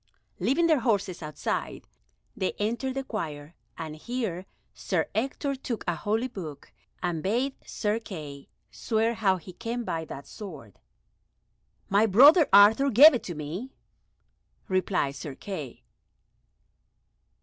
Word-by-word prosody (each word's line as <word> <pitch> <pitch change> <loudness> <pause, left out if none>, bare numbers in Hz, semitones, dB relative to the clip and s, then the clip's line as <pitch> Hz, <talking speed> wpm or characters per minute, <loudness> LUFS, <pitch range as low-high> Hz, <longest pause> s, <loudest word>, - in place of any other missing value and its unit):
Leaving 325 +6 +2
their 315 -4 +4
horses 200 -7 0
outside, 150 -1 -4 0.5
they 190 -5 -1
entered 235 +5 -2
the 270 - -2
choir, 155 - -5 0.2
and 155 -1 -6
here 205 -3 -4 0.3
Sir - - -1
Ector 275 +4 -1
took 255 -4 -5
a 175 - +2
holy 220 +8 -1
book 160 - -9 0.3
and 175 -3 -1
bade 245 - 0
Sir 210 +1 -1
Kay 150 -10 -9 0.2
swear 225 0 0
how 195 -4 +2
he 180 +1 -11
came 235 +6 -4
by 165 -7 -3
that 140 -2 -9
sword. 150 - -10 1.1
"My 205 +3 +3
brother 285 - +7
Arthur 210 +8 +7
gave 280 +7 +9
it 250 - -1
to 175 - -5
me," 170 - -6 0.9
replied 185 -7 0
Sir 140 0 -7
Kay. 155 -7 -7
205 Hz, 125 wpm, -27 LUFS, 165-240 Hz, 1.1 s, gave